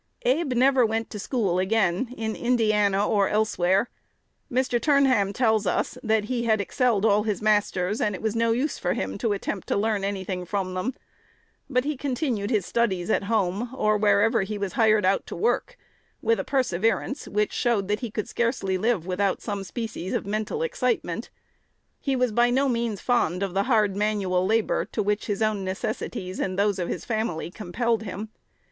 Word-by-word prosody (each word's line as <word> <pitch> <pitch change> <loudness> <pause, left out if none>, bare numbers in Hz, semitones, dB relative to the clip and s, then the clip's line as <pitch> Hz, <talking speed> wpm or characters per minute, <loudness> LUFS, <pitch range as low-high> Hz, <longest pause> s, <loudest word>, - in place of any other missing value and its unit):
Abe 270 +2 +2
never 260 +1 +4
went 225 0 -1
to 210 - -6
school 200 -5 0
again 195 +3 +1
in 220 -1 -2
Indiana 210 -4 +2
or 200 -3 +2
elsewhere. 200 -1 +2 0.6
Mr. 250 -1 +1
Turnham 270 -9 +3
tells 220 -3 +1
us, 180 - 0
that 220 -1 +1
he 235 +2 -2
had 220 -2 +3
excelled 225 0 +1
all 210 -1 +4
his 210 -1 -1
masters, 210 -2 +1
and 210 -2 +1
it - - -8
was 220 0 0
"no 230 0 +2
use" 265 +6 -1
for 180 - 0
him 95 +1 -3
to 225 - 0
attempt 200 -1 -3
to - - 0
learn 210 -1 0
any 195 -1 -2
thing 185 -1 -4
from 185 0 -2
them. 215 +8 -2 0.7
But 250 -2 +2
he 300 +2 -2
continued 250 -6 -2
his 210 -7 +1
studies 195 -5 0
at 195 - +1
home, 210 +1 0
or 215 -4 +2
wherever 210 +2 +3
he 205 +2 -3
was 200 -3 -3
hired 215 -3 +3
out 195 +1 +1
to - - -6
work, - - 0 0.4
with 460 0 +1
a - - -1
perseverance 240 +1 0
which 210 +1 0
showed 225 -6 +1
that 210 +1 0
he 240 - -4
could 215 0 -4
scarcely 230 -6 -1
live 220 -5 +1
without 190 +1 0
some 205 -3 -3
species 210 -3 -5
of - - -2
mental 215 - -2
excitement. 475 -1 -1 0.7
He 275 -2 -1
was 250 -2 +1
by 240 +3 +3
no 265 +3 +2
means 235 -5 -1
fond 200 -7 +1
of 195 -3 -3
the 195 +1 +2
hard 210 -5 +3
manual 200 -3 0
labor 225 +1 +1
to 215 - 0
which 210 +1 -1
his 205 +1 -1
own 215 -2 0
necessities 185 0 -4
and 185 -1 -2
those 200 -1 +1
of 175 - -2
his - - -4
family 215 -8 -2
compelled 225 +4 -1
him. 215 +1 -6
215 Hz, 190 wpm, -25 LUFS, 195-235 Hz, 0.7 s, never